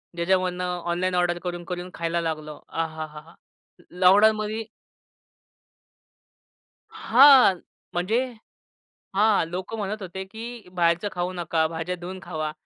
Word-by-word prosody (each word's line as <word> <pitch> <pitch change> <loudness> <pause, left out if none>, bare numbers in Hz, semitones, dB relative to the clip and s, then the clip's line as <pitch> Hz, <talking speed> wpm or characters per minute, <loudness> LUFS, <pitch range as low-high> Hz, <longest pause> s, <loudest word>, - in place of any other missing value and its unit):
ज्याच्यामधनं 180 0 0
online 180 +1 0
order 175 -1 +1
करून-करून 175 0 -5
खायला 170 0 -1
लागलो. 155 -2 -4
आ 165 - -1
हा, 160 0 -6
हा, 150 0 -11
हा! 165 +2 -19 0.6
लॉकडाउनमध्ये 215 +4 +4 2.3
हां. 255 -6 +6 0.3
म्हणजे 210 +9 +1 0.9
हां, 210 -4 +4
लोक 185 +5 -5
म्हणत 210 -1 -4
होते, 190 +1 -6
की 220 0 -9
बाहेरचं 170 +2 +1
खाऊ 180 0 -2
नका, 170 -2 0
भाज्या 165 +2 -4
धुऊन 180 +2 -7
खावा. 155 -2 -4
180 Hz, 115 wpm, -25 LUFS, 170-195 Hz, 2.3 s, हां